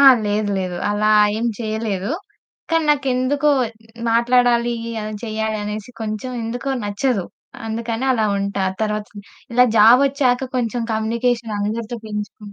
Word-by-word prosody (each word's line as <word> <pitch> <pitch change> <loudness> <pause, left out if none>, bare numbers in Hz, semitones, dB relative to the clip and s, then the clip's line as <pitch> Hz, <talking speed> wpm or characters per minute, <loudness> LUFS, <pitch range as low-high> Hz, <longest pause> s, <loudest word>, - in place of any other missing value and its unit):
ఆ! - - +6 0.2
లేదు. 205 0 0
లేదు 185 -2 -3
అలా 210 +1 +2 0.3
ఏం 235 - 0
చేయలేదు. 220 -1 -2 0.6
కానీ, 330 -1 +2
నాకెందుకో 275 +1 +2 0.6
మాట్లాడాలి, 240 0 +3 0.3
ఏమైనా 215 0 -5
చేయాలి 220 0 -2
అనేసి 210 +3 -5
కొంచెం 215 +3 -4
ఎందుకో 245 +4 -3
నచ్చదు. 205 -1 0 0.4
అందుకని 230 +3 -2
అలా 220 -3 +1
ఉంటా. 200 -1 -1 0.2
తరువాత 210 -1 -1 0.5
ఇలా 250 0 +6
జాబొచ్చాక 255 +3 +4
కొంచెం 240 0 -1
కమ్యూనికేషన్ 230 0 0
అందరితో 225 +3 -3
పెంచుకున్ 210 0 -6
225 Hz, 120 wpm, -20 LUFS, 210-245 Hz, 0.6 s, ఆ